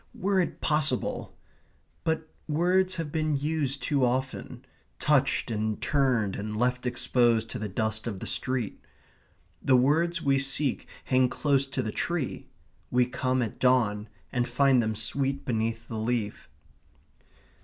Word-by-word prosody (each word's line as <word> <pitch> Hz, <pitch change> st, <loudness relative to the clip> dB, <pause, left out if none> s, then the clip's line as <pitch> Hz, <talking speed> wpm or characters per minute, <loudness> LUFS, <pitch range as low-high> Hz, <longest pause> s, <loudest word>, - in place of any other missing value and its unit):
Were 195 Hz, 0 st, +1 dB
it 180 Hz, -, -1 dB
possible! 150 Hz, -4 st, +1 dB, 0.7 s
But 160 Hz, 0 st, -1 dB, 0.2 s
words 180 Hz, +4 st, +2 dB
have 165 Hz, -4 st, -4 dB
been 155 Hz, -2 st, 0 dB
used 140 Hz, -2 st, -1 dB
too 140 Hz, -3 st, +1 dB
often; 130 Hz, 0 st, -2 dB, 0.3 s
touched 140 Hz, -4 st, +2 dB
and 110 Hz, -1 st, -1 dB
turned, 125 Hz, -9 st, +1 dB
and 105 Hz, +1 st, -4 dB
left 125 Hz, +2 st, 0 dB
exposed 120 Hz, -2 st, +2 dB
to 125 Hz, -, -4 dB
the 105 Hz, -1 st, -4 dB
dust 110 Hz, +2 st, -1 dB
of 100 Hz, -5 st, -4 dB
the -, -, -6 dB
street. 125 Hz, -5 st, -2 dB, 0.8 s
The 135 Hz, -3 st, +4 dB
words 165 Hz, +7 st, +2 dB
we 140 Hz, -4 st, +2 dB
seek 135 Hz, 0 st, -1 dB, 0.2 s
hang 130 Hz, -1 st, +3 dB
close 140 Hz, -1 st, +1 dB
to 135 Hz, -1 st, -2 dB
the 110 Hz, -, -3 dB
tree. 170 Hz, -1 st, -2 dB, 0.4 s
We 125 Hz, 0 st, +3 dB
come 130 Hz, 0 st, 0 dB
at 110 Hz, -, -5 dB
dawn 110 Hz, -5 st, +2 dB, 0.2 s
and 120 Hz, -1 st, 0 dB
find 135 Hz, -3 st, +4 dB
them 110 Hz, -1 st, -1 dB
sweet 135 Hz, +6 st, -2 dB
beneath 115 Hz, -1 st, -2 dB
the 110 Hz, -, -4 dB
leaf. 110 Hz, -2 st, -2 dB
130 Hz, 145 wpm, -28 LUFS, 115-145 Hz, 0.8 s, The